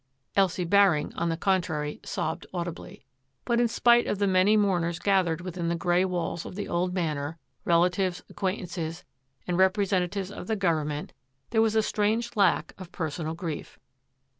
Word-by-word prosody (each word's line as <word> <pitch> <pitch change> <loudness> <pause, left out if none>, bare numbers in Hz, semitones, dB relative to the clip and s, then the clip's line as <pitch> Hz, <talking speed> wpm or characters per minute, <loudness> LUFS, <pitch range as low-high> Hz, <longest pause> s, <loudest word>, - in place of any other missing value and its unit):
Elsie 190 -2 +2
Baring, 185 -5 +3
on 170 - -1
the 165 - -1
contrary, 165 -6 -1
sobbed 160 +2 -3
audibly. 175 -1 -6 0.4
But 235 -1 +2
in 240 - +4
spite 240 +1 +4
of 205 - -1
the 200 - +1
many 190 +2 +4
mourners 175 -5 +1
gathered 180 -4 +1
within 175 -1 -4
the 170 - +1
grey 175 +2 +2
walls 175 -2 -2
of - - -8
the 205 - -4
old 180 +1 0
Manor, 160 -4 -2 0.2
— - - -46
relatives, 180 +1 +2
acquaintances, 180 -4 -4 0.4
and 180 0 -1
representatives 190 0 +1
of - - -8
the 220 - 0
govern 165 -7 +1
ment, 150 0 -5 0.2
— 135 0 -47
there 220 - +3
was 220 -1 +2
a 220 - +4
strange 225 +3 0
lack 195 -4 +2
of 185 -2 -9
personal 160 -1 -3
grief. 165 -3 -6
180 Hz, 170 wpm, -27 LUFS, 165-200 Hz, 0.4 s, in